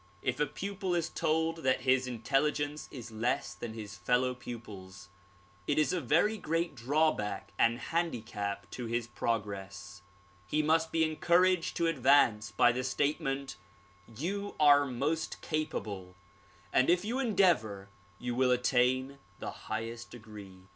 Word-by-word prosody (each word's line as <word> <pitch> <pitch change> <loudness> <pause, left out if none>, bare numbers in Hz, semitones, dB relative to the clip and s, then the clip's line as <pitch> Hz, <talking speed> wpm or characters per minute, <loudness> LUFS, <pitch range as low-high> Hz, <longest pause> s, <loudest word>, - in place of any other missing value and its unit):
If 125 +2 -1
a 150 - +2
pupil 195 -2 -3
is 170 -2 0
told 160 +1 0
that 130 -5 +1
his 130 0 +2
intelligence 145 +5 -1
is 120 -4 -8
less 120 +5 -1
than 115 -2 -7
his 110 -2 -7
fellow 125 +6 +1
pupils, 100 -6 -9 0.6
it 145 - +1
is 150 -3 +3
a 180 - 0
very 170 - +2
great 165 -1 -1
drawback 120 -6 0
and 115 +1 +4
handicap 110 - -3
to 120 -2 -5
his 115 0 -1
progress. 100 -4 -4 0.5
He 155 +8 +1
must 160 +1 +2
be 165 0 +2
encouraged 170 +3 +2
to 170 - +1
advance, 130 -8 +4
by 120 +3 +4
the 125 +2 -2
statement 135 -2 -1 0.5
"You 185 - -4
are 145 -1 +6
most 145 +6 -2
capable 100 - -3 0.6
and 130 - +4
if 180 +2 +3
you 240 +5 -1
endeavor 175 - +2 0.3
you 125 +2 -3
will 130 +1 +2
attain 125 +2 +2 0.2
the - - -5
highest 115 +2 -5
degree." 105 -5 -11
130 Hz, 140 wpm, -31 LUFS, 110-155 Hz, 0.6 s, are